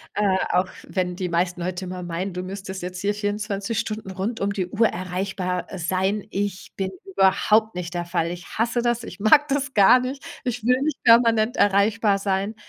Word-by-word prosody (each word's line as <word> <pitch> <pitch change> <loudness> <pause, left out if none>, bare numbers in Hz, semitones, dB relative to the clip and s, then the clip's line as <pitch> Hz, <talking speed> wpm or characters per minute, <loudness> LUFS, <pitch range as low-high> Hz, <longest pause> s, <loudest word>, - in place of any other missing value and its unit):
äh, 200 -2 +2
auch 180 +1 +2 0.2
wenn 180 -2 -2
die 185 -2 -3
meisten 175 +1 0
Leute 185 +1 -3
immer 180 0 -6
meinen, 175 +2 -4
du 180 - -4
müsstest 190 0 -6
jetzt 180 0 -5
hier 205 +2 0
24 205 +1 -2
Stunden 215 -3 -4
rund 200 +5 -3
um 200 0 +1
die 190 -3 -2
Uhr 220 +4 +2
erreichbar, 180 0 -3
äh, 190 - -5
sein. 190 +4 -1
Ich 195 -1 -4
bin 190 -1 -2
überhaupt 195 +3 +3
nicht 180 -1 -5
der 175 -1 -2
Fall. 170 -1 -1
Ich 175 -1 -7
hasse 235 +2 +1
das, 240 0 0
ich - - -9
mag 290 +8 +5
das 280 -1 -1
gar 205 +5 +7
nicht! 260 +2 -5 0.2
Ich 245 -3 -3
will 250 +2 +3
nicht 300 -1 -1
permanent 230 0 +5
erreichbar 205 +1 +3
sein. 195 +2 -1
195 Hz, 195 wpm, -23 LUFS, 185-220 Hz, 0.2 s, gar